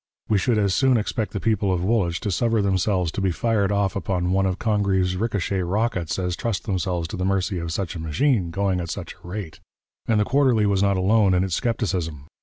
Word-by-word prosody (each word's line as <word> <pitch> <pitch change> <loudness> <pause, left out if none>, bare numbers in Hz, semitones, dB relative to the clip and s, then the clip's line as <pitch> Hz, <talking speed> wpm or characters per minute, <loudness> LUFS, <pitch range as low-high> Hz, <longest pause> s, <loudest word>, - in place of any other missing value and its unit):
We 105 -2 +3
should 115 +3 +1
as 100 -3 +2
soon 130 +5 +3
expect 110 0 -2
the 100 - -3
people 110 -3 +1
of 90 -1 0
Woolwich 95 -5 +1
to 105 - -2
suffer 115 +4 +1
themselves 95 -2 +1
to 100 - -4
be 95 - +2
fired 105 +2 0
off 100 -2 0
upon 90 -1 -1
one 95 +1 +2
of 95 0 -1
Congreve's 100 -4 +1
ricochet 100 -2 -1
rockets 95 -2 -1
as 90 -2 -1
trust 110 -3 -2
themselves 90 -4 -2
to - - -5
the 90 - -2
mercy 95 -1 0
of 85 0 -4
such 90 +1 -3
a - - -5
machine, 90 - +1
going 95 +1 0
at 85 - -5
such - - -5
a - - -11
rate.' 90 -3 -6 0.5
And 110 -2 +2
the 105 - +2
Quarterly 130 -5 +3
was 100 -2 +2
not 100 -1 +2
alone 100 0 +3
in 90 - +2
its 95 -3 -2
scepticism. 90 - -2
95 Hz, 220 wpm, -23 LUFS, 90-105 Hz, 0.5 s, We